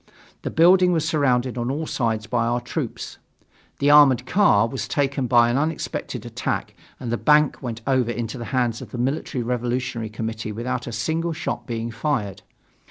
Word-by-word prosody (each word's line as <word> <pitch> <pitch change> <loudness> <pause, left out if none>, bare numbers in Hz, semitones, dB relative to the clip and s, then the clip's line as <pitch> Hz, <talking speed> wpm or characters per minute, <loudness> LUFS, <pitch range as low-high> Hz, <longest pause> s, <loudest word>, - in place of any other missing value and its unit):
The - - -3
building 180 +2 +5
was 160 -2 0
surrounded 130 -5 +1
on 120 +1 -2
all 150 +4 -2
sides 115 -6 -1
by 115 0 0
our 120 +1 +1
troops. 120 - -5 0.6
The 145 +1 +3
armored 135 -4 +6
car 125 - +4
was 130 +3 -4
taken 140 -2 0
by 120 -1 +4
an 130 - +1
unexpected 155 +2 -3
attack - - -3 0.3
and 120 -3 -5
the 120 - 0
bank 150 +2 +3
went 115 -3 -5
over 130 -3 +1
into 120 +1 -4
the 120 - -5
hands 120 -3 -1
of - - -9
the - - -7
Military 130 0 -2
Revolutionary 120 -1 -2
Committee 110 0 -4
without 115 +5 -3
a - - -4
single 160 +9 -1
shot 160 - -4
being 115 -1 -3
fired. 110 -6 -2
125 Hz, 175 wpm, -23 LUFS, 115-145 Hz, 0.6 s, armored